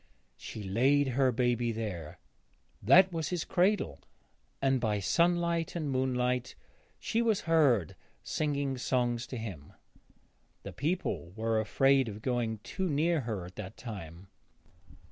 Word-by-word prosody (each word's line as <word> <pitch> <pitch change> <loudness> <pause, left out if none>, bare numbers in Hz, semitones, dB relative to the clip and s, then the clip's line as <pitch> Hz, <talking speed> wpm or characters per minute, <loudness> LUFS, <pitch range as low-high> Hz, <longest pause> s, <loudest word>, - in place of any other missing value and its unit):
She 110 - -8
laid 135 +8 +2
her 130 +1 +2
baby 120 -1 +1
there. 100 -9 -5 0.6
That 175 - +6
was 160 -2 -2
his 180 -2 -2
cradle, 180 - +1 0.6
and 135 -2 +1
by 105 -3 0
sunlight 170 - +1
and 155 -5 -2
moonlight 125 -1 0 0.4
she 230 - 0
was 225 -4 +2
heard 140 - +3 0.3
singing 145 -2 -1
loud 130 - -4
songs 120 -2 0
to 125 - -6
him. 100 -11 -7 0.9
The - - -7
people 145 - -2
were 110 0 0
afraid 135 +3 +3
of 105 +1 -9
going 120 -3 -1
too 190 -1 -3
near 160 +3 +2
her 110 -7 -4
at 90 +1 -13
that 105 0 -7
time. 95 -6 -8
125 Hz, 135 wpm, -30 LUFS, 110-150 Hz, 0.9 s, That